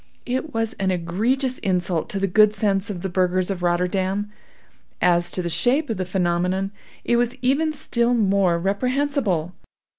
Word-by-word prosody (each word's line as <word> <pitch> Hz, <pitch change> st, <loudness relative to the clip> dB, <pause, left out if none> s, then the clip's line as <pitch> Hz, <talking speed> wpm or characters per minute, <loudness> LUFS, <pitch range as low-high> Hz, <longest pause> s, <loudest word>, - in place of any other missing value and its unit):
It 260 Hz, +5 st, -2 dB
was 225 Hz, -1 st, -2 dB
an 190 Hz, -1 st, +1 dB
egregious 220 Hz, +10 st, 0 dB
insult 180 Hz, -3 st, -1 dB
to 195 Hz, -, -2 dB
the 195 Hz, -, +1 dB
good 210 Hz, +2 st, +4 dB
sense 200 Hz, 0 st, 0 dB
of 185 Hz, -3 st, -5 dB
the -, -, 0 dB
burghers 185 Hz, +1 st, +1 dB
of 185 Hz, -2 st, -4 dB
Rotterdam. 185 Hz, +3 st, 0 dB, 0.7 s
As 175 Hz, 0 st, +3 dB
to 180 Hz, -, -2 dB
the -, -, -2 dB
shape 255 Hz, -, +1 dB
of 220 Hz, -, -2 dB
the 185 Hz, -, -2 dB
phenomenon, 180 Hz, +1 st, 0 dB, 0.3 s
it 240 Hz, -, +2 dB
was 240 Hz, +1 st, 0 dB
even 285 Hz, +5 st, +2 dB
still 245 Hz, -4 st, 0 dB
more 195 Hz, -5 st, +2 dB
reprehensible. 200 Hz, -, -1 dB
195 Hz, 160 wpm, -22 LUFS, 180-240 Hz, 0.7 s, good